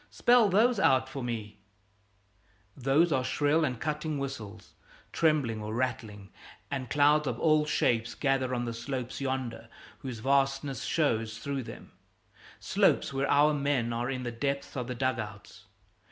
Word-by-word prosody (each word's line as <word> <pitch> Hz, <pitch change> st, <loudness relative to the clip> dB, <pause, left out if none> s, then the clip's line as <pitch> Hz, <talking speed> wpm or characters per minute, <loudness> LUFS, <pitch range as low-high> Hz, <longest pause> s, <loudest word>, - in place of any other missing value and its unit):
Spell 240 Hz, -3 st, +4 dB
those 220 Hz, +4 st, +3 dB
out 130 Hz, -7 st, +3 dB
for 135 Hz, 0 st, -6 dB
me 110 Hz, -3 st, -5 dB, 0.5 s
" 100 Hz, 0 st, -40 dB, 0.5 s
Those 140 Hz, +6 st, +2 dB
are 130 Hz, -3 st, +1 dB
shrill 145 Hz, +4 st, +1 dB
and 125 Hz, -6 st, -1 dB
cutting 150 Hz, +1 st, -2 dB
whistles, 110 Hz, -7 st, -7 dB, 0.4 s
trembling 145 Hz, -9 st, +1 dB
or 105 Hz, +1 st, -4 dB
rattling; 110 Hz, -5 st, -3 dB, 0.4 s
and 130 Hz, -3 st, -3 dB
clouds 150 Hz, +1 st, +3 dB
of -, -, -2 dB
all 155 Hz, -1 st, +3 dB
shapes 115 Hz, -5 st, +1 dB
gather 135 Hz, -2 st, 0 dB
on 120 Hz, 0 st, -2 dB
the 115 Hz, -, -3 dB
slopes 125 Hz, +2 st, -5 dB
yonder 125 Hz, -4 st, -3 dB, 0.3 s
whose 130 Hz, -3 st, -6 dB
vastness 135 Hz, +1 st, 0 dB
shows 115 Hz, -8 st, 0 dB
through 140 Hz, +3 st, -3 dB
them, 120 Hz, -, -10 dB, 0.7 s
slopes -, -, +2 dB
where 135 Hz, +1 st, -1 dB
our 150 Hz, +1 st, +5 dB
men 140 Hz, -5 st, 0 dB
are 120 Hz, +2 st, -2 dB
in 130 Hz, -1 st, -3 dB
the 120 Hz, -, -3 dB
depths 140 Hz, +5 st, -3 dB
of 125 Hz, -3 st, -3 dB
the 125 Hz, -, -4 dB
dug 130 Hz, -1 st, 0 dB
outs. 100 Hz, -1 st, -9 dB
130 Hz, 155 wpm, -29 LUFS, 115-145 Hz, 0.7 s, our